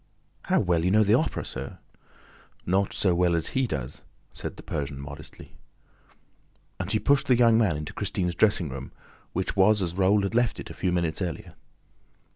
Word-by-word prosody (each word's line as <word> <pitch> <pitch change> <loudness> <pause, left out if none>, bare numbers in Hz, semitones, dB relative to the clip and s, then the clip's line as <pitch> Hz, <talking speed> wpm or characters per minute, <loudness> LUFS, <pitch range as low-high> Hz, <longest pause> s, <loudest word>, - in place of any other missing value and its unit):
"How - - +2
well 85 -4 +1
you 90 - +2
know 110 +3 +5
the 105 +1 +3
Opera, 145 +7 +1
sir!" 65 +1 -6 0.9
"Not 95 +2 +1
so 95 -3 +1
well 85 0 +2
as 80 - -1
'he' 130 -1 0
does!" 65 - -5 0.3
said - - -7
the - - -11
Persian 70 -2 -4
modestly. 70 +1 -10 1.3
And 95 +1 -3
he 110 - +3
pushed 140 +4 +2
the 125 - +4
young 115 -2 +5
man 105 -9 +2
into 75 0 -6
Christine's 95 -3 -1
dressing 95 -2 +2
room, 65 0 -7 0.4
which 95 +2 -2
was 105 +2 +4
as 85 -3 -1
Raoul 100 +2 +3
had 100 - -2
left 120 -1 +1
it - - -7
a - - -7
few 90 - -1
minutes 85 0 0
earlier. 85 -4 -4
95 Hz, 185 wpm, -26 LUFS, 85-105 Hz, 1.3 s, know